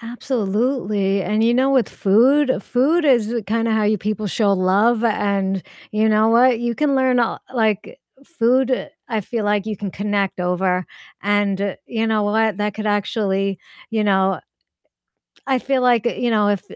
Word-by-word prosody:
Absolutely, 220 -4 -1
and 215 +3 0
you 235 +1 +3
know, 260 +2 +2
with 255 -6 +2
food, 260 +8 +2
food 295 +7 +1
is 240 -5 +2
kind 230 +1 0
of 225 - +1
how 220 - +1
you 210 0 +1
people 210 +1 -3
show 200 0 +1
love, 200 +5 +2
and 200 -3 0 0.3
you 215 +1 +1
know 215 +1 +3
what? 235 +1 +4
You 240 -1 -2
can 295 -2 +1
learn 260 -2 +2
a 235 - 0
like 230 - -1 0.3
food, 255 -3 0 0.2
I 220 -3 -1
feel 220 +2 -4
like 205 0 0
you 215 -1 -3
can 200 0 -5
connect 200 -1 -2
over, 180 0 -1 0.3
and 200 -1 0
you 225 -1 -2
know 220 -1 +1
what? 215 0 0
That 210 -1 -2
could 215 0 -5
actually, 200 -2 -1 0.3
you 220 -1 0
know 190 -1 +2 1.1
I 265 -2 +1
feel 265 0 -1
like, 245 -3 +3
you 240 0 -1
know, 210 -2 +2
if 200 -3 0
215 Hz, 170 wpm, -20 LUFS, 200-240 Hz, 1.1 s, what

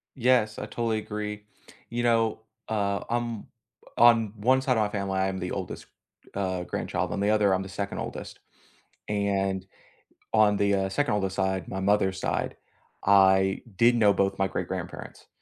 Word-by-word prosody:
Yes, 120 -4 +2
I - - -4
totally 110 0 -1
agree. 105 -1 -5 0.5
You 120 +1 -2
know, 115 -2 +2 0.3
uh, 100 -2 0
I'm 120 -2 -2 0.5
on 115 -3 +5
one 130 +5 +3
side 130 -3 +1
of 110 - +3
my 105 - +1
family, 100 -2 -2
I 95 0 +1
am 95 - -3
the 90 0 -4
oldest, 95 -2 -5 0.5
uh, 95 -2 -2
grandchild, - - -3
on - - -2
the 100 +1 +2
other, 105 -3 +3
I'm 95 - 0
the 95 - -8
second 100 +1 -4
oldest. - - -6 0.7
And 100 -2 -1 0.7
on 105 -2 +5
the, 100 0 +2
uh, 95 0 0
second 145 -1 0
oldest 95 -2 -1
side, 95 -1 -1
my 95 - -4
mother's 95 -1 +1
side, - - -2 0.5
I 95 -1 +4
did 120 +4 +5
know 105 -3 +4
both 100 0 0
my 95 0 +1
great-grandparents, - - -6
100 Hz, 165 wpm, -27 LUFS, 95-110 Hz, 0.7 s, on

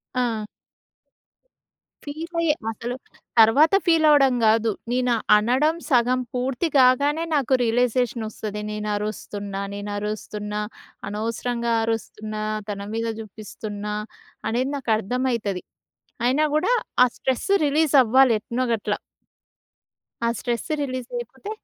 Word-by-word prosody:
ఆ! 230 -4 0 1.6
ఫీల్ 320 +4 -7
అయ్యే 310 -3 +3 0.2
అసలు 240 +3 -5 0.4
తర్వాత 285 - +6
ఫీల్ 325 -2 +4
అవ్వడం 275 -4 +5
గాదు. 220 +1 +4 0.2
నేను 250 -1 +2 0.2
అనడం 260 +9 +2
సగం 250 0 +3
పూర్తి 255 +6 -1
కాగానే 280 +5 +4
నాకు 275 -2 +1
రియలైజేషన్ 240 0 +1
ఒస్తది. 210 -1 -5
నేను 210 0 -4
అరుస్తున్నా. 205 -1 -4
నేను 205 0 -5
అరుస్తున్నా. 210 0 -4 0.5
అనవసరంగా 230 +2 -2
అరుస్తున్నా 215 -1 -3 0.3
తన 200 -1 -4
మీద 230 0 -1
చూపిస్తున్నా. 210 0 -6 0.5
అనేది 250 +4 0
నాకు 255 -4 -4
అర్థమైతది. 230 -4 -1 0.6
అయినా 270 +5 +3
గూడా 455 +11 +2 0.3
ఆ - - +7
స్ట్రెస్ 260 - -2 0.2
రిలీజ్ 300 +1 +2
అవ్వాలి 255 +1 +5
ఎట్నొ 240 +3 -2
గట్ల. 210 -1 -1 1.3
ఆ - - +3
స్ట్రెస్ 240 -2 -3
రిలీజ్ 255 -2 -4
అయిపోతే 265 - -8
240 Hz, 110 wpm, -23 LUFS, 215-265 Hz, 1.6 s, ఆ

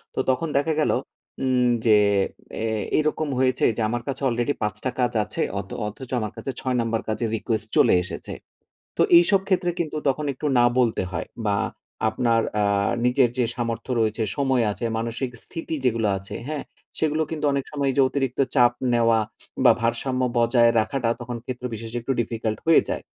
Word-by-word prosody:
তো - - -2
তখন 130 +6 +1
দেখা 155 +3 +1
গেল, - - +2 0.5
উম 125 -1 +2 0.2
যে 110 -2 +6 0.7
এ - - 0 0.3
এরকম 155 0 0
হয়েছে 130 -1 +1
যে - - -1
আমার 120 +1 -2
কাছে 135 0 -4
already 120 +4 0
৫ 105 -1 -1
টা 130 - 0
কাজ 125 -1 +2
আছে 105 - -5 0.2
অথ 100 -1 -7 0.2
অথচ 120 +5 -8
আমার 110 -2 -3
কাছে 135 - -4
৬ 130 -1 -1
নাম্বার 115 -1 -1
কাছে 110 +2 -1
request 110 0 -2
চলে - - +6
এসেছে। 90 - -6 0.6
তো - - +3 0.2
এইসব 190 +3 +5
ক্ষেত্রে 185 -2 +1
কিন্তু 155 -2 -2
তখন 145 +2 0
একটু 130 - -7
না 120 - +6
বলতে 115 -6 +2
হয় 85 - -4 0.2
বা 100 -1 +2 0.5
আপনার 115 +1 +1 0.2
আ - - +3 0.4
নিজের 125 0 +4
যে 125 - +2
সামর্থ্য 115 0 -3
রয়েছে, 110 0 +1
সময় 130 -3 +2
আছে, 105 +4 -4
মানসিক 115 +3 -3
স্থিতি 165 -1 -5
যেগুলো 115 -3 +2
আছে 100 +2 -7
হ্যা? 150 -1 -3 0.4
সেগুলো 155 0 +1
কিন্তু 155 -2 -2
অনেক 140 -1 -1
সময় 140 -2 0
যে - - +6
অতিরিক্ত 135 -3 -2 0.2
চাপ 125 -2 +6 0.2
নেওয়া 115 -1 +4 0.5
বা - - +9
ভারসাম্য 120 +3 0 0.2
বজায় 120 0 +4
রাখাটা 115 +2 0
তখন 120 0 -5
ক্ষেত্র 125 0 -5
বিশেষে 115 +2 -5
একটু 135 +4 -1
difficult 110 -1 -3
হয়ে 165 - +7
যায়। - - -3
120 Hz, 180 wpm, -24 LUFS, 115-135 Hz, 0.7 s, বা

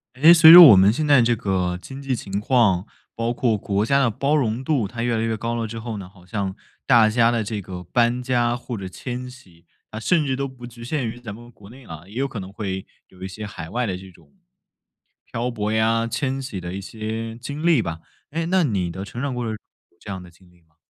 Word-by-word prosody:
诶， 155 +6 +7
随 165 -1 +9
着 175 - +12
我 105 - +9
们 95 +2 +5
现 150 +7 -2
在 140 -3 +6
这 120 0 +2
个 95 -5 -1
经 135 +8 -10
济 135 -2 -2
情 100 -3 -4
况， 105 -6 +2 0.3
包 115 +1 -1
括 120 -2 +1
国 100 +1 -1
家 140 +4 +2
的 135 -4 +3
包 140 +7 0
容 125 -3 0
度， 130 -7 0
它 115 +3 -5
越 120 -1 0
来 110 - -1
越 115 -1 -1
高 115 +2 -3
了 115 -1 -2
之 115 +1 -7
后 110 -1 -6
呢， 95 -2 -9
好 90 -2 -20
像 95 -1 -4 0.3
大 120 -4 +6
家 115 +1 +3
的 115 -2 0
这 105 0 -4
个 90 -1 -8
搬 120 +6 +1
家 120 -2 0
或 120 0 -7
者 95 -3 -6
迁 125 +5 -6
徙， 90 -10 -18 0.3
啊 110 - -6
甚 160 +6 +1
至 135 -2 -1
都 140 +1 -3
不 130 -2 -12
局 120 -1 -12
限 130 0 -2
于 115 +2 -7
咱 115 -4 -8
们 120 +2 -14
国 100 -3 -16
内 130 +2 -15
啊， 80 -4 -10
也 100 - -15
有 135 +3 0
可 125 -5 -7
能 95 0 -8
会 95 -2 -5 0.2
有 95 - -19
一 95 - -4
些 105 +3 -8
海 85 -5 -8
外 125 +4 -1
的 95 -5 -2
这 95 +1 -12
种 80 -5 -23 0.9
漂 120 +2 -3
泊 105 -2 -3
呀、 115 +1 +1
迁 135 +3 -2
徙 130 -8 -6
的 90 0 -6
一 100 - -5
些 110 +2 -6
经 145 +6 -6
历 170 -6 +4
吧， 85 -5 -5 0.3
诶， 165 +2 -2
那 185 0 +2
你 95 - -1
的 95 +3 -6
成 120 +4 -7
长 140 -2 -2
过 125 - -3
程 110 - -3 0.4
有 - - -35
这 - - -11
样 95 -2 -5
的 90 - -14
经 90 +1 -23
历 90 -1 -26
吗？ 80 -1 -38
115 Hz, 275 characters per minute, -22 LUFS, 100-125 Hz, 0.9 s, 着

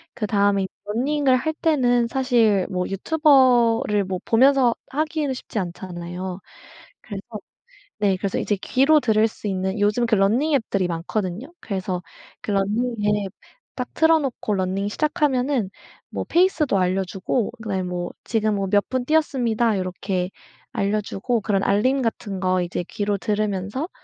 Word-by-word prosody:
그다음에 200 -2 +1 0.2
running을 265 +3 +2
할 315 +5 -2
때는 245 -7 +2
사실 230 -7 +2
뭐 180 -1 -1
유튜버를 240 - +3
뭐 185 -1 -3
보면서 255 0 +4
하기에는 300 0 -1
쉽지 240 -3 -5
않잖아요. 180 +1 -6 0.6
그래서 200 -2 -7 0.8
네 195 -3 +2
그래서 195 +1 -2
이제 205 - 0
귀로 275 +9 +3
들을 220 -3 +3
수 220 - -13
있는 190 +1 -2
요즘 210 +4 +2
그 225 - +3
running 235 +11 +2
앱들이 195 -7 0
많거든요. 185 - -4
그래서 185 -3 -3 0.4
그 - - -4
running을 210 0 0
앱 190 - -12 0.4
딱 250 -1 -4
틀어 320 0 +5
놓고 260 -6 -3
running을 190 +1 -1
시작하면은 275 - 0 0.4
뭐 - - -4
페이스도 335 - +2
알려주고 190 +4 0
그다음에 200 -4 -2
뭐 180 -1 -4
지금 220 -2 0
뭐 195 -1 -1
"몇 205 -1 +3
분 255 -1 -1
뛰었습니다." 240 -8 +1
요렇게 185 0 -2 0.4
알려주고 210 +3 -1
그런 200 -2 0
알림 255 +8 +2
같은 205 -4 -3
거 185 -1 +1
이제 175 0 -3
귀로 205 -1 -1
들으면서 210 - -2
210 Hz, 365 characters per minute, -23 LUFS, 195-255 Hz, 0.8 s, 틀어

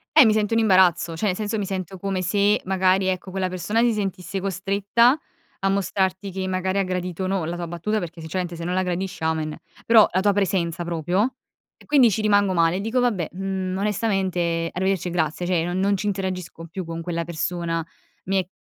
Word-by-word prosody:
Eh, - - +9
mi 215 - +5
sento 215 +1 +1
in 225 - +3
imbarazzo. 185 -5 +4
Cioè, 210 +5 -1
nel 185 - +1
senso, 215 +1 -2
mi 200 - -1
sento 190 -1 -4
come 190 0 -2
se, 205 +2 +2
magari 190 0 +2
ecco, 185 0 -2
quella 190 -1 -1
persona 185 +6 0
si 240 -1 +3
sentisse 195 -1 -3
costretta 200 - +2 0.4
a 195 - +2
mostrarti 190 0 0
che 190 0 -3
magari 185 +1 -1
ha 195 - +3
gradito 180 0 -3
o 185 - -1
no, 190 -4 -1
la 170 +2 -3
tua 175 -1 -4
battuta, 175 +6 -2
perché 170 -2 -7
sinceramente 175 +1 -3
se 165 - -7
non 180 - -2
la 185 0 +1
gradisce, 180 0 -3
amen. 160 -1 -1 0.3
Però 225 -2 +7
la 185 - +1
tua 205 0 +3
presenza 175 -4 0
proprio, 175 - 0 0.4
e - - -19
quindi 275 -6 +5
ci 215 - -1
rimango 205 -2 +3
male, 170 +1 +2
dico: 225 +4 0
“Vabbè, 210 -10 0
mhmm, 190 0 -3
onestamente, 190 -5 0
arrivederci 190 -1 0
e - - -6
grazie”. 165 0 -1
Cioè, 175 -2 +1
non 175 +1 -2
non 200 +1 +2
ci 210 +2 -3
interagisco 185 -4 -4
più 185 +2 -5
con 165 0 -5
quella 170 0 -2
persona. 165 0 -2 0.4
Mi 195 +1 +1
è 180 - -12
185 Hz, 210 wpm, -23 LUFS, 175-200 Hz, 0.4 s, Eh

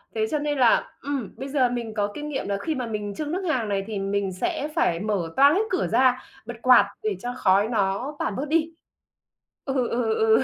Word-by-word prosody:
Thế 220 -1 +1
cho 300 - +1
nên 295 0 -1
là, 245 -3 +3
ừm, 275 -7 -3
bây 270 - -5
giờ 265 -3 +2
mình 235 -2 -4
có 205 -1 -1
kinh 300 0 -5
nghiệm 280 - -3
là 200 0 -1
khi 315 - -2
mà 255 -2 -3
mình 210 -2 -4
chưng 300 -1 -3
nước 365 +3 -2
hàng 240 -8 0
này 195 -1 0
thì 215 -3 -3
mình 195 0 -1
sẽ 230 +10 -2
phải 165 - +2
mở 200 -4 -1
toang 280 +2 +6
hết 400 - +3
cửa 370 - 0
ra, 255 -1 +3 0.2
bật 240 +1 -6
quạt 250 -4 +6 0.2
để 215 -2 0
cho 245 +4 -4
khói 195 -2 +3
nó 220 +5 -1
tản 200 - -2
bớt 275 - -2
đi. 325 +1 +1 0.9
Ừ, 270 - -2 0.2
ừ, 230 -2 0
ừ. 220 +3 +4
240 Hz, 230 wpm, -24 LUFS, 205-280 Hz, 0.9 s, toang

